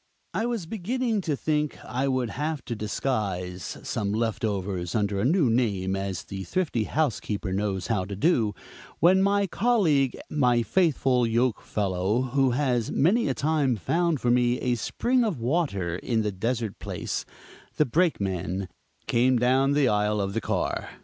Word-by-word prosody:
I 225 - 0
was 230 -7 -2
beginning 225 +4 -1
to 155 -5 -1
think 150 +1 -1
I 130 +2 -1
would 130 -3 0
have 150 0 -3
to 120 - -3
disguise 100 - -3
some 100 -2 -2
"left 110 0 -1
overs" 95 -4 -2
under 100 -2 0
a 100 - +1
new 160 +1 +3
name, 100 -6 +1
as 95 -3 -3
the 95 -1 -6
thrifty 150 - -1
housekeeper 110 -10 -1
knows 95 -1 -1
how 105 -6 0
to 100 +1 -6
do, 110 - +2 0.4
when 185 +3 +5
my 200 +1 +3
colleague, 175 - +2
my 125 -5 +2
faithful 130 -6 +2
yoke 115 0 +1
fellow, 100 +3 0
who 135 -1 +3
has 125 -6 +1
many 215 - +2
a - - 0
time 145 -4 +1
found 165 - 0
for 120 - +1
me 120 0 +2
a 125 -2 +1
spring 245 - 0
of 200 - -1
water 115 - -1
in 115 +2 -1
the 105 - -1
desert 115 +2 -2
place - - -4 0.5
the 150 - +3
Brakeman, 100 - 0 0.4
came 125 +2 +3
down 130 +3 +3
the 145 -2 +3
aisle 105 -1 +1
of 100 -1 -1
the - - -1
car. - - -2
125 Hz, 165 wpm, -26 LUFS, 105-155 Hz, 0.5 s, when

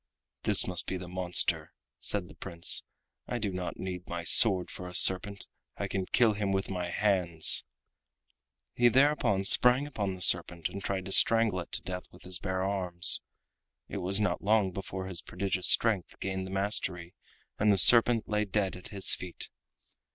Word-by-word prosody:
"This - - +1
must 90 -2 -1
be 95 - -4
the 90 -1 -10
monster," 90 -1 0 0.3
said 100 -4 -2
the - - -15
Prince; 85 -3 0 0.5
"I 120 - -4
do 105 -4 -4
not 90 -1 -6
need 90 -1 -7
my 85 -1 -6
sword 95 +2 +6
for 90 - -9
a 90 - -8
serpent. 100 +3 +3 0.3
I - - -4
can 95 -2 -5
kill 115 -3 +2
him 100 -1 -3
with 95 0 -3
my 90 -2 -5
hands." 90 -4 +2 1.1
He 120 - +2
thereupon 130 -6 +1
sprang 125 +7 +3
upon 100 -10 -5
the 90 - -11
serpent 85 -1 +3
and 100 - -9
tried 95 -2 -4
to 95 - -8
strangle 115 -2 +3
it 85 - -9
to - - -5
death 90 0 -7
with - - -18
his 90 -1 -4
bare 95 -1 -4
arms. 95 -3 +1 0.7
It - - -7
was 95 +3 0
not 105 - -2
long 105 -2 +1
before 95 0 -7
his 90 -3 -6
prodigious 95 -2 -3
strength 110 -6 0
gained 95 -1 -5
the - - -10
mastery 95 -3 -2 0.5
and 105 0 +2
the 100 - +2
serpent 115 +3 +6
lay 105 0 -1
dead 100 -1 -3
at 90 - -11
his 100 -2 +1
feet. 90 -2 -6
95 Hz, 180 wpm, -28 LUFS, 90-105 Hz, 1.1 s, sword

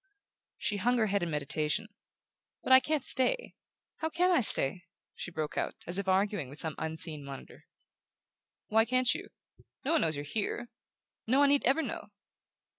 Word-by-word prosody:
She 205 - -2
hung 245 +5 +1
her 225 - +2
head 200 -1 0
in 175 - -2
meditation. 150 +7 -1 0.8
"But 260 - +3
I 260 - +10
can't 300 0 -1
stay. 485 - +3 0.4
How 320 - -2
CAN 355 +3 +1
I 345 - +4
stay?" 175 - +4 0.3
she - - -7
broke 155 -3 -4
out, - - -3
as 175 +3 +1
if 200 - -4
arguing 190 -6 0
with 145 - -9
some 160 -1 -2
unseen 160 -1 -4
monitor. 140 -1 -11 1.0
"Why 220 +1 +3
can't 255 +2 +1
you? - - -7 0.6
No 290 - 0
one 330 - +3
knows 160 -1 0
you're 145 +1 -5
here...No 230 - -5
one 285 0 +5
need 285 0 +2
ever 275 +6 +2
know." - - -6
205 Hz, 170 wpm, -30 LUFS, 160-260 Hz, 1.0 s, I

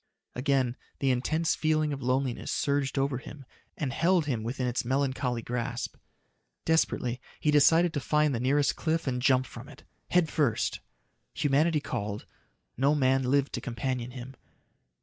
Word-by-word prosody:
Again 130 -2 0 0.2
the 135 -1 +1
intense 155 +6 +1
feeling 155 -1 +1
of 135 - -5
loneliness 130 0 -1
surged 140 -1 0
over 135 -2 0
him 140 0 -11 0.3
and 135 -4 -2
held 170 +1 +2
him 125 -6 -1
within 125 +3 -3
its 125 0 -1
melancholy 130 -2 -1
grasp. 120 -1 -3 0.7
Desperately, 125 -6 +1 0.2
he 150 - +2
decided 160 +4 +5
to 145 - -1
find 150 +1 +2
the 115 - -1
nearest 140 +3 +2
cliff 165 0 -1
and 125 -2 -1
jump 130 -1 +3
from - - -10
it - - -14 0.3
head 180 -2 +3
first! 140 -8 0 0.6
Humanity 150 +2 +2
called; 105 -5 -4 0.5
no 140 +4 +3
man 135 -2 +3
lived 135 +2 +1
to - - -3
companion 125 -1 -3
him. 125 +1 -9
135 Hz, 150 wpm, -28 LUFS, 125-150 Hz, 0.7 s, decided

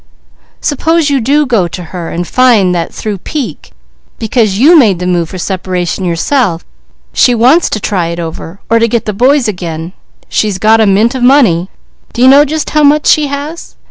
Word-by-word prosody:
"Suppose 320 +1 0
you 275 -2 +1
do 290 +6 +1
go 225 -9 0
to 180 +1 -8
her 175 -2 -5
and 175 +1 -4
find 230 -8 +2
that 170 -2 -3
through 210 -3 -5
pique, 250 - -6 0.5
because 220 -3 0
you 300 +10 +5
made 220 - +4
the 180 - -5
move 175 -2 -1
for 185 - -8
separation 185 -1 -3
yourself, 175 - -1 0.5
she 245 - +3
wants 260 +9 +3
to 215 - -3
try 190 -4 -2
it 170 +1 -5
over, 165 +2 -7
or 230 +1 +2
to 230 - +2
get 230 -1 -2
the 210 - -3
boys 260 +5 +2
again 170 -3 -5 0.3
she's 210 -3 -1
got 220 +3 +3
a 220 - +3
mint 210 +5 +2
of 260 - -5
money. 235 -10 +3 0.4
Do 240 - -1
you - - +6
know 280 +2 +6
just 310 +1 -4
how 305 - +1
much 295 +1 +3
she 300 -1 +3
has?" 285 +4 -7
220 Hz, 195 wpm, -10 LUFS, 180-275 Hz, 0.5 s, you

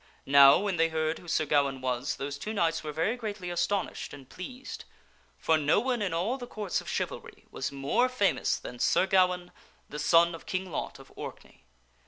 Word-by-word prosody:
Now, 140 0 +8
when 200 -2 -1
they 165 0 +3
heard 160 0 -1
who 175 - -15
Sir 155 -1 +1
Ga 145 0 +4
waine 135 -1 -4
was, 130 +1 -2
those 140 +1 -5
two 215 - -4
knights 165 -5 0
were 155 - -4
very 165 +10 0
greatly 210 -6 -5
astonished 175 +1 -2
and 135 -3 -14
pleased; 255 - -8 0.5
for 160 -1 +2
no 150 +5 +3
one 245 0 -1
in 200 -4 -1
all 195 +11 -1
the 245 - -7
courts 210 -5 -3
of - - -9
chivalry - - -4
was - - -3
more 140 - +1
famous 205 -6 +1
than 125 - -9
Sir 185 - +3
Gawaine, 180 -2 +2 0.4
the 150 - -6
son 170 +3 +4
of 165 - -10
King 185 -1 -3
Lot - - -4
of - - -16
Orkney. - - -10
170 Hz, 200 wpm, -29 LUFS, 150-200 Hz, 0.5 s, Now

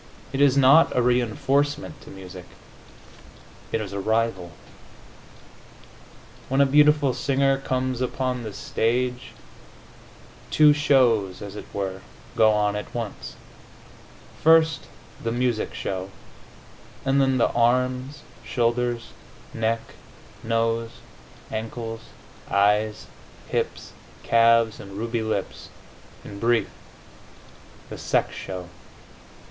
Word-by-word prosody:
It 135 - 0
is 140 -1 +5
not 140 +4 +5
a - - +4
reinforcement 125 0 0
to - - -13
music; 90 -2 -10 1.3
it - - 0
is 100 -2 -6
a 100 - -3
rival. 110 -4 -1 2.0
When 135 +1 +1
a 140 - +6
beautiful 145 -1 +4
singer 135 0 +1
comes 130 -1 -2
upon 125 0 -2
the 110 -2 -6
stage, 125 +5 -2 1.2
two 150 -1 +6
shows, 125 -10 +2
as 100 0 -8
it - - -8
were, 95 -1 -4 0.3
go 110 -1 +5
on 105 -1 +1
at 105 - -6
once: 115 -3 -6 1.1
first 160 -2 +4 0.4
the 115 - -1
music 120 -2 -1
show, 95 0 -4 1.0
and 135 +1 +3
then 135 -1 +2
the 120 - +2
arms, 125 +4 0 0.2
shoulders, 120 -1 -1 0.4
neck, 115 0 0 0.6
nose, 115 0 0 0.6
ankles, 115 +1 -5 0.5
eyes, 105 +2 +2 0.4
hips, - - -3 0.3
calves 115 -1 +4
and 100 -1 -10
ruby 115 +3 -2
lips 110 0 -4 0.6
in 100 -1 -9
brief, 120 +1 +1 1.2
the - - -7
sex - - 0
show. 90 -2 -7
115 Hz, 105 wpm, -24 LUFS, 110-130 Hz, 2.0 s, a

